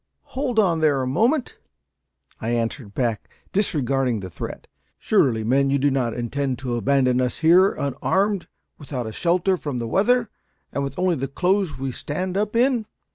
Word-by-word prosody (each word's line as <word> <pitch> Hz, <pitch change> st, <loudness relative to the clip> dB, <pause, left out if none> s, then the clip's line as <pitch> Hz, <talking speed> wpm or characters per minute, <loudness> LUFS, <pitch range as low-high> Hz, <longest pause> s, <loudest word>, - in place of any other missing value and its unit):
"Hold 260 Hz, -3 st, -2 dB
on 180 Hz, -6 st, +3 dB
there 145 Hz, -4 st, +2 dB
a -, -, -1 dB
moment," 230 Hz, -, +1 dB, 0.8 s
I 110 Hz, -, -3 dB
answered 115 Hz, -2 st, -2 dB
back, 115 Hz, -5 st, -1 dB, 0.2 s
disregarding 135 Hz, -, +1 dB
the 95 Hz, -1 st, -7 dB
threat. -, -, -7 dB, 0.3 s
"Surely, 115 Hz, -4 st, +2 dB
men, 135 Hz, +5 st, +2 dB
you 140 Hz, -, +2 dB
do 140 Hz, +1 st, +2 dB
not 125 Hz, -4 st, 0 dB
intend 130 Hz, +2 st, -2 dB
to 125 Hz, -1 st, -4 dB
abandon 130 Hz, 0 st, +2 dB
us 125 Hz, -1 st, -1 dB
here, 185 Hz, +4 st, +6 dB
unarmed; 190 Hz, +8 st, 0 dB, 0.3 s
without 135 Hz, -5 st, -5 dB
a 110 Hz, -, -5 dB
shelter 180 Hz, -, +1 dB
from 145 Hz, -6 st, -4 dB
the 115 Hz, -1 st, -3 dB
weather, 230 Hz, -, +2 dB, 0.4 s
and 140 Hz, -, -1 dB
with 140 Hz, -1 st, -5 dB
only 180 Hz, -2 st, +1 dB
the 135 Hz, +1 st, -2 dB
clothes 180 Hz, +1 st, 0 dB
we 135 Hz, 0 st, -3 dB
stand 180 Hz, +9 st, -4 dB
up 210 Hz, +2 st, -1 dB
in?" 240 Hz, -2 st, +2 dB
140 Hz, 170 wpm, -23 LUFS, 125-190 Hz, 0.8 s, here